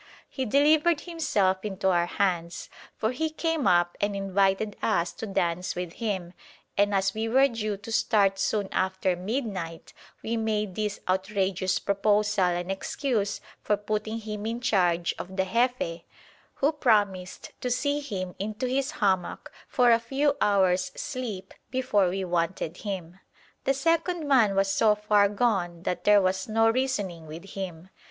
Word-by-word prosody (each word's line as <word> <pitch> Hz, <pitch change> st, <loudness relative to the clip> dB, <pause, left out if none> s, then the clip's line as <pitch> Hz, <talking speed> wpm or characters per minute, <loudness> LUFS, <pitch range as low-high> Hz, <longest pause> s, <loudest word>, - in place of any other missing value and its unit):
He 265 Hz, -, -4 dB
delivered 300 Hz, +6 st, +4 dB
himself 205 Hz, -, 0 dB
into 195 Hz, -2 st, -1 dB
our 175 Hz, -1 st, +2 dB
hands, 175 Hz, -3 st, -1 dB, 0.3 s
for 220 Hz, -, 0 dB
he 315 Hz, +5 st, -1 dB
came 320 Hz, -1 st, -1 dB
up 175 Hz, 0 st, +3 dB
and 205 Hz, 0 st, 0 dB
invited 195 Hz, +1 st, +1 dB
us 170 Hz, +1 st, +1 dB
to 225 Hz, -, -6 dB
dance 180 Hz, -2 st, -1 dB
with 180 Hz, -1 st, -4 dB
him, 190 Hz, -6 st, -3 dB, 0.4 s
and 205 Hz, +1 st, +3 dB
as 195 Hz, 0 st, +1 dB
we 220 Hz, +1 st, -2 dB
were 265 Hz, +4 st, +5 dB
due 215 Hz, -5 st, -3 dB
to 205 Hz, +3 st, -9 dB
start 200 Hz, -3 st, +2 dB
soon 205 Hz, 0 st, 0 dB
after 190 Hz, -1 st, 0 dB
midnight 185 Hz, -5 st, -4 dB, 0.3 s
we 230 Hz, +1 st, -1 dB
made 215 Hz, -3 st, -1 dB
this 210 Hz, +1 st, -2 dB
outrageous 190 Hz, 0 st, 0 dB
proposal 205 Hz, 0 st, +2 dB
an 175 Hz, +1 st, -1 dB
excuse 210 Hz, +1 st, -2 dB, 0.2 s
for 210 Hz, -, +1 dB
putting 215 Hz, +1 st, -3 dB
him 215 Hz, -1 st, -5 dB
in 230 Hz, +1 st, -2 dB
charge 175 Hz, -8 st, +1 dB
of 190 Hz, +1 st, -7 dB
the 190 Hz, -, +2 dB
Jefe, 235 Hz, -6 st, 0 dB, 0.5 s
who 285 Hz, +3 st, +2 dB
promised 205 Hz, -, 0 dB
to 250 Hz, -, -1 dB
see 285 Hz, +4 st, 0 dB
him 190 Hz, -10 st, -5 dB
into 215 Hz, +5 st, -3 dB
his 265 Hz, +2 st, 0 dB, 0.2 s
hammock 190 Hz, -2 st, 0 dB, 0.2 s
for 245 Hz, -2 st, +4 dB
a 230 Hz, -, +5 dB
few 275 Hz, +5 st, 0 dB
hours' 185 Hz, -3 st, +3 dB
sleep 250 Hz, -9 st, -5 dB, 0.2 s
before 230 Hz, -8 st, +2 dB
we 190 Hz, +2 st, -2 dB
wanted 175 Hz, -1 st, -2 dB
him. 185 Hz, -3 st, -6 dB, 0.5 s
The 270 Hz, -, +2 dB
second 330 Hz, +2 st, 0 dB
man 230 Hz, -8 st, +4 dB
was 195 Hz, 0 st, +2 dB
so 210 Hz, +2 st, +4 dB
far 210 Hz, -1 st, +3 dB
gone 195 Hz, -6 st, 0 dB
that 180 Hz, -, -3 dB
there 205 Hz, -1 st, +6 dB
was 190 Hz, +2 st, -1 dB
no 225 Hz, +1 st, +4 dB
reasoning 205 Hz, -10 st, -2 dB
with 170 Hz, +5 st, -9 dB
him. 185 Hz, -2 st, -6 dB
205 Hz, 155 wpm, -27 LUFS, 185-235 Hz, 0.5 s, there